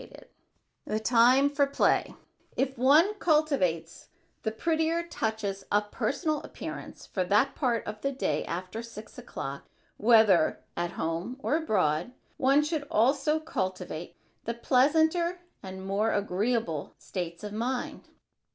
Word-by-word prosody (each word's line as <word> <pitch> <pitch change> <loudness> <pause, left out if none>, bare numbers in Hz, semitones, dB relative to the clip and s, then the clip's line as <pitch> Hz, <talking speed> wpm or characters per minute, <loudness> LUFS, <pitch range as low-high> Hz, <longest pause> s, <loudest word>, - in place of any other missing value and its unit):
[Sidenote: - - -14 0.6
THE 215 - -1
TIME 250 +5 +5
FOR 285 -1 +2
PLAY] 275 - +1 0.4
If 270 0 0
one 295 - +5
cultivates 270 - +1 0.3
the 220 - -1
prettier 320 +6 0
touches 220 - -3
of 205 0 +1
personal 305 +1 -1
appearance - - -8
for 185 - -2
that 210 +9 +3
part 240 -6 0
of 210 0 -6
the 275 - 0
day 270 - -1
after 185 +6 -5
six 230 -2 -10
o'clock, 140 +1 -7 0.3
whether 215 -7 +4
at 175 0 -2
home 165 +9 -3
or 275 +2 0
abroad, 190 - 0 0.2
one 275 +3 +4
should 300 -2 -2
also 280 +7 +2
cultivate 185 - -4 0.3
the 230 - -2
pleasanter 320 +8 +2 0.2
and 190 0 -8
more 205 +3 +1
agreeable 205 -4 -1
states 170 -2 -6
of 210 0 -6
mind. 245 +3 -3
230 Hz, 130 wpm, -28 LUFS, 190-285 Hz, 0.6 s, TIME